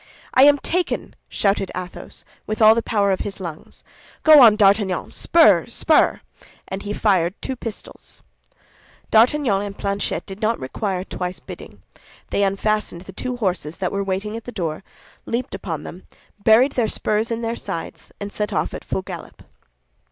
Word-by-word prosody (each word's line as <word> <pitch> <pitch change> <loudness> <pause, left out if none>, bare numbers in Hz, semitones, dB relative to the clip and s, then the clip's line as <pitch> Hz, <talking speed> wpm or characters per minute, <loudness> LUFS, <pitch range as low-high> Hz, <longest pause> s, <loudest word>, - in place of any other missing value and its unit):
"I 260 - +7
am 290 0 +6
taken!" 355 +5 -2
shouted 195 -1 0
Athos, 180 0 -8 0.2
with 215 - -3
all 220 -1 +8
the 230 - 0
power 205 -3 +1
of 190 - 0
his 200 -1 -5
lungs. 170 -4 -9 0.4
"Go 310 -2 +9
on, 225 -4 +8
D'Artagnan! 200 -2 +2
Spur, 210 - +4
spur!" 305 +6 +2 0.5
and 190 +1 -5
he 205 - -5
fired 190 -3 +1
two 265 - -4
pistols. 230 -3 -9 0.9
D'Artagnan 230 -2 +3
and 200 -1 -6
Planchet 200 0 -2
did 195 +2 -9
not 225 +1 0
require 185 - -3
twice 180 -1 -5
bidding; - - -11 0.5
they - - +1
unfastened 200 -2 0
the 190 +1 -12
two 250 +5 -4
horses 180 -7 -2
that 185 - -2
were 200 0 -1
waiting 195 +3 -3
at 230 - -7
the 245 - -6
door, 170 -5 -4 0.4
leaped 235 +2 -3
upon 160 -6 -5
them, 185 - -10 0.4
buried 235 +6 +5
their 240 -4 0
spurs 215 +1 -1
in 230 0 -3
their 230 +1 -2
sides, 165 - -7
and 200 0 -6
set 210 0 -2
off - - -1
at - - -7
full 190 - -3
gallop. - - -9
205 Hz, 165 wpm, -21 LUFS, 190-230 Hz, 0.9 s, Go